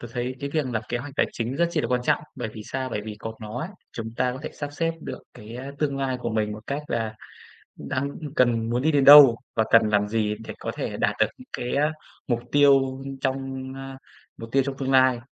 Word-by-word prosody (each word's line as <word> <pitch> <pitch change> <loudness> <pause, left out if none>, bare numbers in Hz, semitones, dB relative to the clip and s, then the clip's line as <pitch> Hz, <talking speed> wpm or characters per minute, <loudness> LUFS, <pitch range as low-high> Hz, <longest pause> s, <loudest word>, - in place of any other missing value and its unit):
tớ 120 - -8
thấy 125 +1 -2
cái 140 - -3
việc 155 -2 0
lập 115 -3 -2
kế 120 - -1
hoạch 140 +3 -7
tài - - +3
chính 120 +4 -3
rất 170 +1 +2
chi 160 - 0
là - - -1
quan 125 -1 +1
trọng, - - +1
bởi 125 -4 -3
vì 110 0 -9
sao? 130 0 -3
Bởi 105 - -2
vì 105 -1 -6
có 110 +1 -5
nó 110 +2 -6
ấy, 165 - -4 0.2
chúng 115 0 -6
ta 125 0 +1
có 130 - -7
thể - - -5
sắp 145 -1 -6
xếp 165 +2 0
được - - -7
cái 110 +3 -10 0.2
tương 140 -2 0
lai 130 -1 -1
của 120 - -2
mình 110 -1 0
một 105 +2 -10
cách 140 +2 -3
là 110 -2 -2 0.6
đang 140 +1 -3 0.2
cần 115 -2 +2
muốn 120 +1 0
đi 155 +2 +2
đến 140 -2 +3
đâu 140 -4 +10 0.2
và 110 - +3
cần 115 -1 +6
làm 105 -1 +2
gì 105 -1 0
để - - -7
có - - -4
thể - - -3
đạt - - +1
được - - +6
những - - -14
cái 120 - -3
á, 150 +2 +2 0.4
mục 120 -2 +1
tiêu 135 -2 +4 0.2
trong, 130 -1 -3
ơ 135 0 -8 0.4
mục 115 - -8
tiêu 135 0 +4
trong 135 -1 -3
tương 135 -1 -2
lai. 130 -2 +5
130 Hz, 250 wpm, -25 LUFS, 115-140 Hz, 0.6 s, đâu